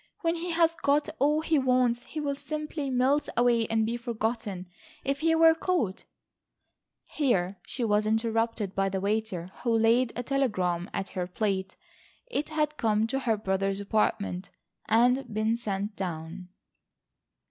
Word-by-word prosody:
"When 330 -1 +1
he 345 +1 -4
has 330 -1 +3
got 290 -2 +1
all 300 +3 +3
he 315 -2 +2
wants 250 -2 +2
he 305 +5 -7
will 285 -2 -1
simply 300 0 -4
melt 265 +3 +2
away 235 -2 +3
and 225 -1 +1
be 235 +2 -2
forgotten. 225 -5 -3 0.4
If 275 +1 -1
he 325 0 +3
were 325 0 +7
caught—" 320 - -1 1.0
Here 200 -10 0
she 250 - -4
was 210 -1 +2
interrupted 225 -2 0
by 195 0 +1
the 190 0 -2
waiter 200 -3 -2
who 245 - -1
laid 230 +2 +3
a 245 - -3
telegram 200 -10 0
at 195 - -3
her 180 -1 -3
plate. 190 0 -2 0.6
It 300 - -1
had 305 -1 -1
come 215 -1 +2
to 270 +4 -1
her 230 -5 +1
brother's 195 -1 -1
apartment, 200 -2 -1 0.4
and 245 +4 +3
been 215 +1 +1
sent 205 -2 -3
down. 180 0 -5
230 Hz, 150 wpm, -28 LUFS, 200-275 Hz, 1.0 s, were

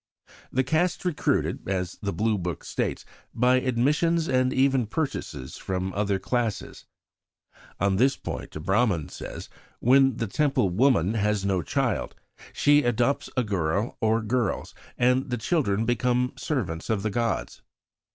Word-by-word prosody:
The 130 - +2
Caste 160 +6 +1
is - - -14
recruited, 165 - 0
as 90 -2 -2
the 100 - -2
Blue 110 -1 0
Book 85 -3 -4
states, - - -3 0.3
by 125 +2 +4
"admissions 150 +7 +1
and 130 0 +2
even 130 -3 +2
purchases 90 - -4
from 95 0 -3
other 100 -1 0
classes." 115 0 -3 0.9
On 100 0 +2
this 130 +5 +3
point - - -6
a - - -4
Brahman 95 -2 +1
says: - - -8 0.3
"When 135 0 +4
the 115 - -1
Temple 135 -4 +1
woman 110 -3 +3
has 105 -2 0
no 95 -2 +1
child, 75 - -1 0.4
she 145 0 +4
adopts 120 +2 0
a 125 - +3
girl 100 +1 -1
or 110 0 +2
girls, 120 +2 -1 0.2
and 125 +2 +2
the 125 - -1
children 115 - 0
become 125 +2 +1
servants 95 - -3
of 105 -3 0
the 110 - -1
gods. 115 +2 -2
115 Hz, 145 wpm, -26 LUFS, 100-130 Hz, 0.9 s, by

